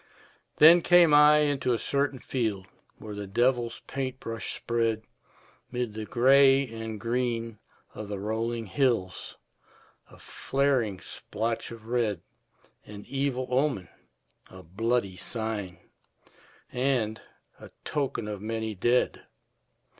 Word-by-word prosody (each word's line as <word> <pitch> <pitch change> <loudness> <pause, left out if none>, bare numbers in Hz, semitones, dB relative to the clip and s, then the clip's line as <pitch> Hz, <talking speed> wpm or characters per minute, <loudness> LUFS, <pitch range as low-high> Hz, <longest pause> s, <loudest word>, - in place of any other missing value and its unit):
Then 165 +3 +8
came 175 -2 +6
I 150 +1 +7
into 140 -4 +1
a - - +1
certain 140 +2 0
field 110 -7 -2 0.3
Where 105 -1 -8
the 100 -1 -6
devil's 120 +3 0
paint 130 -1 -4
brush 115 -2 -4
spread 115 -2 -1 0.7
'Mid 125 -3 -3
the 110 0 -5
gray 135 +2 +5
and 110 -1 -6
green 115 -1 -2 0.3
of 110 -1 -7
the 100 0 -4
rolling 115 +3 -2
hills 115 -5 -1 0.7
A - - -16
flaring 130 -8 -1
splotch 115 +1 -4
of 115 -2 -11
red, 115 -6 -1 0.6
An 105 -1 -11
evil 135 -2 -1
omen, 130 -7 0 0.6
a 95 0 -12
bloody 100 +2 -1
sign, 110 -3 -4 0.9
And 125 -4 0 0.4
a - - -12 0.2
token 135 -6 -2
of 105 -2 -5
many 110 0 -3
dead. 120 +6 0
115 Hz, 115 wpm, -27 LUFS, 110-130 Hz, 0.9 s, Then